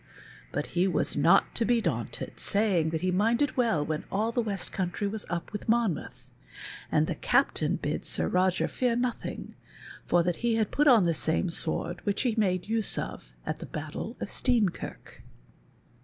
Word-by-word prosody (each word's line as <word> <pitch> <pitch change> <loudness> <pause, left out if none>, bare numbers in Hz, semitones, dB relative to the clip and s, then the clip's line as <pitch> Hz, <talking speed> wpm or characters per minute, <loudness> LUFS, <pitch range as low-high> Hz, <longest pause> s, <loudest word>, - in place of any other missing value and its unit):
"" - - -20
but 145 - -2
he 180 +2 +3
was 175 -5 +1
not 165 +7 +4
to 235 - +1
be 235 +1 +3
daunted, 225 - -3
saying 200 -6 +2
he 165 +3 -1
minded 230 +9 +2
well 225 - +2
when 155 0 -2
all 215 +4 0
the 240 - +1
West 205 -4 -3
Country 190 +2 -2
was 210 +1 -5
up 170 +3 -4
with 210 - -5
Monmouth; 225 -8 0 0.6
and - - +3
the - - -2
Captain - - +2
bid - - -3
Sir - - -1
Roger 185 0 +2
fear 245 -2 0
nothing, 245 0 -3 0.5
for 175 -1 +4
that 175 -1 0
he 235 -1 +1
had 220 -2 0
put 295 +1 +2
on 230 -9 +7
the 170 - +2
same 160 +3 0
sword 170 +2 -3
which 200 -1 0
he 245 -3 +1
made 185 -5 +1
use 225 -1 +1
of - - -6
at - - -3
the - - -7
battle - - -6
of - - -3
Steenkirk. 230 -8 -1
200 Hz, 180 wpm, -28 LUFS, 175-230 Hz, 0.6 s, on